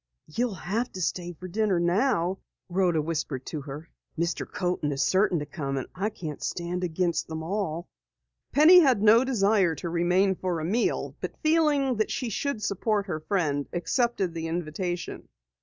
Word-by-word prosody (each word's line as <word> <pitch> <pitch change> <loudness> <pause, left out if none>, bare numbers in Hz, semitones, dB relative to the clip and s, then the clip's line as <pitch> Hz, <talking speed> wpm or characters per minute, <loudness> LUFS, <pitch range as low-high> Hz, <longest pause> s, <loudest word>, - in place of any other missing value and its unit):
"You'll 230 +6 -2
have 215 +8 -2
to 185 - -6
stay 175 0 -2
to 180 +3 -9
dinner 200 -1 +1
now," 185 0 +1 0.3
Rhoda 175 -4 +2
whispered 150 -4 -3
to 155 - -4
her. 145 +4 -8 0.3
"Mr. 170 0 -2
Coaten 175 -5 -1
is 135 - 0
certain 190 -1 +3
to 150 - -3
come, 140 -2 -4
and 130 - -2
I 200 +4 -1
can't 155 -8 -7
stand 175 +1 -3
against 175 0 0
them 160 0 -5
all." 175 -2 -2 0.6
Penny 320 +5 +8
had 260 - +4
no 225 +3 +7
desire 200 -8 +2
to 170 - -5
remain 180 +3 +2
for 180 -2 -2
a 155 - -3
meal, 220 +8 0
but - - -5
feeling 300 -5 +3
that 215 - +1
she 250 - -2
should 255 0 -2
support 205 +1 0
her 170 -5 -3
friend, 155 -5 -1
accepted 190 +1 0
the 165 -1 -4
invitation. 175 +2 -4
180 Hz, 170 wpm, -27 LUFS, 165-215 Hz, 0.6 s, Penny